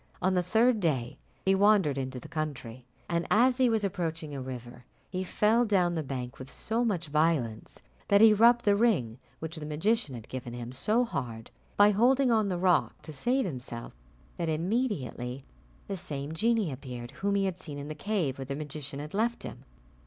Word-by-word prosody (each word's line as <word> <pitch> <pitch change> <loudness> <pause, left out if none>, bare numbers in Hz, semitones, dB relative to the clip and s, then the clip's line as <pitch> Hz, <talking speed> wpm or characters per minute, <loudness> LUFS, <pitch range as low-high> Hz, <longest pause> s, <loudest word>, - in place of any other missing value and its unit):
On 185 +1 +1
the 180 - +3
third 220 +6 +3
day 135 -10 -1 0.3
he 190 - +4
wandered 195 -7 +4
into 130 -1 -4
the - - -11
country, 130 -6 -5 0.2
and 170 0 -1
as 245 +3 +4
he 255 -2 +4
was 220 -2 +1
approaching 165 -5 -3
a 135 - -4
river, 125 -1 -8 0.3
he 185 +1 -2
fell 215 +5 +2
down 185 -6 +2
the 165 - -1
bank 130 -2 -5
with 130 0 -9
so 230 +2 -1
much 190 -7 0
violence 150 -8 0 0.3
that 200 -1 +5
he 220 0 +8
rubbed 235 +3 +5
the 205 -1 +5
ring 170 - +1 0.2
which 160 +1 -5
the 155 - -6
magician 160 - 0
had 115 -2 -9
given 125 -2 -6
him 120 0 -6
so 215 - +1
hard 120 - -5 0.3
by 205 0 +7
holding 250 +5 +3
on 215 -3 +2
the 180 - -1
rock 180 -2 +2
to 155 - -8
save 250 - +1
himself, 125 -7 -6 0.4
that 170 -1 -1
immediately 155 - -2 0.4
the 200 - -3
same 145 -3 -5
genie 220 0 +1
appeared 125 -2 -7
whom 200 0 +1
he 200 -1 +2
had 185 -2 -3
seen 150 -5 -7
in 145 0 -6
the 155 - -4
cave 155 -5 -2
where 135 - -4
the 135 +1 -4
magician 145 -1 -6
had 150 +2 -7
left 230 +4 0
him. - - -9
165 Hz, 195 wpm, -29 LUFS, 135-210 Hz, 0.4 s, he